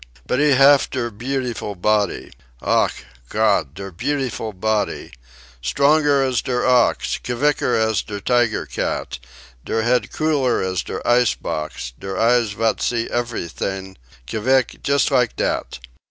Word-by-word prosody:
"But 125 - 0
he 150 -1 +4
haf 140 +2 +5
der 120 -3 -3
beautiful 120 -2 -3
body 105 +3 0 0.3
ach, - - 0 0.2
Gott, 70 - +1
der 95 0 -7
beautiful 130 - -2
body! 105 +2 -2 0.5
stronger 140 - +3
as 130 -2 0
der 125 -2 -1
ox, 125 -2 +2
k 125 - -3
vicker 145 +4 +1
as 110 -2 +1
der 105 -2 -6
tiger 120 +1 +1
cat, - - -3 0.4
der 110 - -1
head 125 +2 +1
cooler 145 -6 +1
as 95 -2 -1
der - - -6
ice 120 -1 +4
box, 75 -5 -5
der 95 -1 -5
eyes 115 -2 +3
vat 110 +1 0
see 115 -1 0
eferytings, 95 -4 -4 0.3
k 65 - -4
vick, 130 +3 +1
just 140 -2 +2
like - - +2
dat. - - -2
120 Hz, 140 wpm, -21 LUFS, 100-130 Hz, 0.5 s, haf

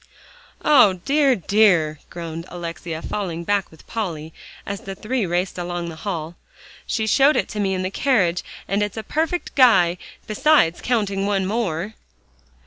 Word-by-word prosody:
"O 255 -10 +6
dear! 275 +8 +2
dear!" 180 -7 +3
groaned 165 0 -7
Alexia, 170 -1 -6
falling 175 -5 -3
back 200 +1 0
with 160 - -18
Polly 165 -8 -4 0.3
as 200 0 -4
the 195 0 -7
three 225 +1 -2
raced 180 +2 -1
along 175 -1 -4
the 165 - -8
hall, 165 -2 -5 0.5
"she 220 - -1
showed 275 +7 +4
it - - +1
to 215 - -5
me 195 -2 0
in 185 - -2
the 185 - -2
carriage, 195 -10 +1 0.2
and 200 +2 0
it's 205 +1 -2
a 220 - -4
perfect 325 +6 -2
guy, 180 -10 +5 0.3
besides 215 - +3
counting 200 -5 0
one 195 -2 +1
more." 200 -2 -2
195 Hz, 155 wpm, -22 LUFS, 170-220 Hz, 0.5 s, O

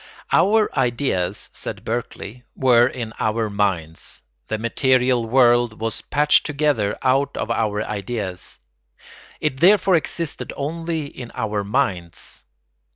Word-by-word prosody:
] - - -17
Our 210 +5 +4
ideas, 120 -8 0
said - - -5
Berkeley, 125 +5 -5
were 120 -2 +5
in 120 -4 -5
our 110 0 0
minds; 95 -6 -2 0.2
the 110 - -2
material 125 +1 +2
world 120 -2 +4
was 115 0 -2
patched 150 0 +3
together 145 -9 0
out 135 +2 +2
of 115 - -2
our 105 -2 0
ideas; 100 -7 -5 0.8
it 135 -3 -1
therefore 190 +1 +5
existed 165 0 -2
only 160 +2 -3
in 125 -4 -9
our 105 -2 -1
minds. 100 - -2
120 Hz, 120 wpm, -22 LUFS, 105-140 Hz, 0.8 s, were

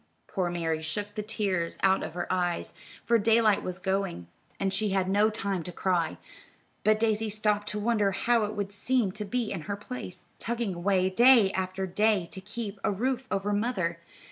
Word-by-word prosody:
Poor 185 -3 -1
Mary 165 -2 -1
shook 205 +7 -4
the 210 - -3
tears 200 -5 -1
out 190 0 +4
of 160 - -6
her 175 - -2
eyes, 175 -2 -1 0.3
for 235 -1 +4
daylight 220 -1 +4
was 180 -1 -4
going, 190 - -2 0.3
and 195 -1 0
she 205 +2 +1
had 190 -1 +1
no 205 +3 +4
time 200 -4 -2
to 180 - -7
cry; 175 -3 0 0.7
but 215 0 +4
Daisy 220 -1 +1
stopped 210 0 0
to 210 +1 -3
wonder 210 -2 +2
how 235 +4 +2
it 210 - -5
would 200 -1 -3
seem 220 +1 +1
to 210 +3 -5
be 230 +2 -2
in 190 -5 -3
her 200 - 0
place, 210 -2 -8
"tugging 235 -4 -2
away" 185 +1 +2
day 230 +1 +6
after 190 0 -2
day 205 -1 +2
to 190 - -7
keep 210 0 -6
a - - +2
roof 255 +5 -1
over 200 +1 -1
mother. 195 -6 -1
200 Hz, 190 wpm, -28 LUFS, 185-215 Hz, 0.7 s, day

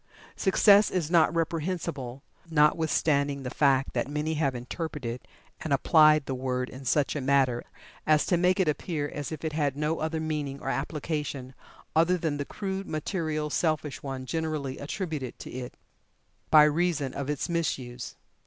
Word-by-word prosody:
Success 200 +2 +5
is 170 -4 -2
not 165 -3 +5
reprehensible, 160 -5 -3 0.3
notwithstanding 150 -2 +2
the 125 - -4
fact 135 -2 +2
that - - -1
many 150 +2 -2
have 145 -4 0
interpreted 125 -1 -5 0.4
and 155 - -5
applied 155 +1 +5
the 135 - -3
word 125 0 -2
in 135 +1 -10
such 140 +3 +1
a 145 - -2
matter 130 -2 +2 0.4
as 155 -1 +4
to 180 - +2
make 180 +3 +2
it 185 - +3
appear 150 0 -1
as 145 0 -6
if 160 +1 -6
it 155 - -2
had 145 -3 0
no 150 +2 -1
other 160 +1 -2
meaning 150 -3 -3
or 135 - -4
application 140 -1 -3 0.4
other 170 +3 +4
than 160 -4 -1
the 145 - -3
crude, 195 +2 -4
material 155 -2 -2
selfish 155 -3 -1
one 135 -2 -5
generally 155 -3 -3
attributed 150 - -4
to - - -9
it, 125 -1 -7 0.7
by 155 -1 +8
reason 150 -3 +1
of 140 0 -4
its 150 -2 -1
misuse. 130 -8 -3
150 Hz, 160 wpm, -28 LUFS, 135-160 Hz, 0.7 s, by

